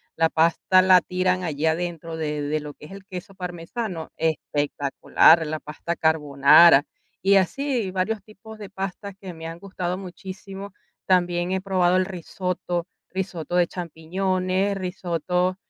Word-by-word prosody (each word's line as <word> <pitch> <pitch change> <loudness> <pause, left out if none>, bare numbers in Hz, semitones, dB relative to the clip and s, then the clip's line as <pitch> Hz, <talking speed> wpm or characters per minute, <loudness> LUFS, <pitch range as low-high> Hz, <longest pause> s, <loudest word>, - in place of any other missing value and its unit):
la 165 0 +3
pasta 170 +3 +3
la 185 -1 +6
tiran 185 +1 0
allí 155 -2 -2
adentro 165 0 -2
de 150 -2 -2
de 150 +2 -1
lo 150 -1 -8
que - - -14
es - - -15
el 195 0 -10
queso 190 +1 -8
parmesano, 180 +1 -5
espectacular, 150 +1 +2
la 155 0 -3
pasta 150 +3 -5
carbonara. 150 -1 +6 0.4
Y 195 +1 +4
así, 225 - +1
varios 195 +3 -1
tipos 215 +1 -13
de 205 -2 -9
pastas 195 +1 -5
que 185 -2 -7
me 160 0 -10
han 165 +1 -8
gustado 185 -2 -4
muchísimo. 190 +1 -9 0.3
También 175 -1 +1
he 190 - -1
probado 185 -2 +2
el 185 - +3
risotto, 180 -1 -3 0.2
risotto 180 -3 -4
de 175 -1 +4
champiñones, 185 +3 -1
risotto 180 -1 -1
180 Hz, 145 wpm, -24 LUFS, 165-190 Hz, 0.4 s, la